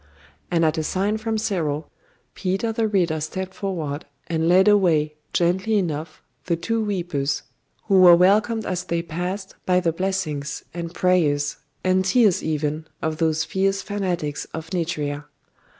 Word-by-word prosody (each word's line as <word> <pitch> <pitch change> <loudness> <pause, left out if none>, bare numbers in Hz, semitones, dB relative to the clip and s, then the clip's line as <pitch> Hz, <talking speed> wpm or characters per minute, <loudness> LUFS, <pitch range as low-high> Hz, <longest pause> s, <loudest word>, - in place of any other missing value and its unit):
And 165 -1 +2
at 160 +1 +1
a - - -1
sign 200 +6 0
from 220 0 -1
Cyril, 165 -8 -2 0.4
Peter 195 +4 -1
the 225 0 0
Reader 175 -7 +1
stepped 185 +4 -4
forward, 160 -8 -4 0.2
and 165 -1 0
led 190 +3 +5
away, 170 -7 +4 0.2
gently 190 +5 +2
enough, 155 -4 -3 0.2
the 170 - +1
two 225 +7 -1
weepers, 175 -9 -1 0.4
who 195 -3 +4
were 175 -1 +9
welcomed 210 +5 +3
as 180 -1 -2
they 170 0 -1
passed 180 +4 -4
by 180 0 +4
the 170 -2 +1
blessings, 165 -6 -2
and 170 -1 -5
prayers, 160 -6 +1 0.3
and 185 0 +3
tears 205 0 +3
even 155 0 -2
of 160 -1 -2
those 160 -1 +1
fierce 195 +2 0
fanatics 180 -8 -2
of 160 +1 -7
Nitria. 150 -5 -2
175 Hz, 150 wpm, -23 LUFS, 155-195 Hz, 0.4 s, were